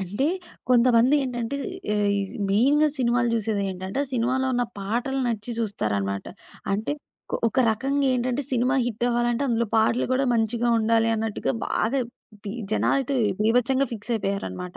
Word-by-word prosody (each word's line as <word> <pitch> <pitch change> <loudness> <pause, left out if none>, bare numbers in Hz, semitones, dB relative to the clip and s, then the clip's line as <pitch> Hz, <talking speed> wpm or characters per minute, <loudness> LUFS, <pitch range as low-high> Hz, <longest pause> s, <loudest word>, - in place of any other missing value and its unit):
అంటే 205 +9 -1 0.4
కొంతమందేంటంటే, 250 +1 +3 0.4
ఏఇజ్ 200 -1 0 0.2
మెయిన్‌గా 280 +9 +4
సినిమాలు 240 -1 +2
జూసేదేంటంటే, 195 -2 -2
ఆ - - -7
సినిమాలో 255 +2 +1
ఉన్న 245 0 +1
పాటలు 240 +7 -2
నచ్చి 225 0 -3
జూస్తారన్నమాట. 100 - -2 0.5
అంటే 215 +7 -1 0.4
కొ - - 0
ఒక 255 +3 +1
రకంగేంటంటే 255 +2 0
సినిమా 255 +1 +1
హిట్ 240 0 -2
అవ్వాలంటే 240 +1 +1
అందులో 235 -2 +1
పాటలు 225 +2 +3
గూడా 270 +1 +2
మంచిగా 235 +1 +1
ఉండాలి 225 +1 +2
అన్నట్టుగా 220 +1 -2
బాగా 260 +5 0 0.4
బి 200 - -5 0.2
జనాలైతే 275 +4 +1 0.3
బీభత్సంగా 250 +5 +2
ఫిక్స్ 225 +1 -6
అయిపోయారన్నమాట. 195 -3 -3
235 Hz, 125 wpm, -25 LUFS, 210-255 Hz, 0.5 s, మెయిన్‌గా